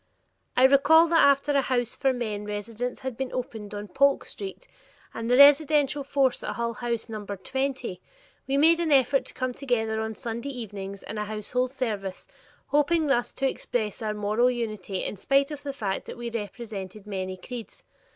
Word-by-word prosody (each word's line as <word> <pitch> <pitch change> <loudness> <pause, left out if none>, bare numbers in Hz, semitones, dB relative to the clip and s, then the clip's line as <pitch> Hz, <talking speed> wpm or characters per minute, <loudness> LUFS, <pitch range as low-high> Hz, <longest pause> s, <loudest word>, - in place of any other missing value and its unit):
I 255 - +5
recall 280 +5 +6
that 330 -1 +5
after 280 +1 +4
a 280 -1 +3
house 245 -3 -1
for 270 -2 +2
men 220 -5 -3
residents 215 +4 -4
had 260 -2 -4
been 265 +1 -4
opened 220 -4 -5
on 205 0 -5
Polk 280 +7 +3
Street 400 +5 -7 0.5
and 230 +1 -4
the 250 - +4
residential 290 0 +6
force 270 -2 +1
at - - -3
Hull 235 -1 -1
House 235 -1 -3
numbered 205 -3 -7
twenty, 265 -8 -2 0.5
we 270 +1 +1
made 325 +3 +5
an 335 -2 0
effort 270 0 +4
to - - -7
come 255 -1 -2
together 225 -5 -1
on 220 0 -3
Sunday 235 +3 -5
evenings 200 -6 -6
in 215 - -6
a 210 - -2
household 215 +4 -2
service, 210 -8 -4 0.4
hoping 300 +3 +3
thus 260 -4 +1
to 270 - 0
express 230 -4 -3
our 215 -1 -2
moral 210 +4 +2
unity 215 -6 -3
in - - -4
spite 275 +7 +2
of 295 -1 -6
the 285 -1 -4
fact 205 -8 -3
that - - -7
we 235 0 -5
represented 210 -3 -6
many 190 -2 -4
creeds. 235 +4 -9
245 Hz, 180 wpm, -26 LUFS, 215-275 Hz, 0.5 s, recall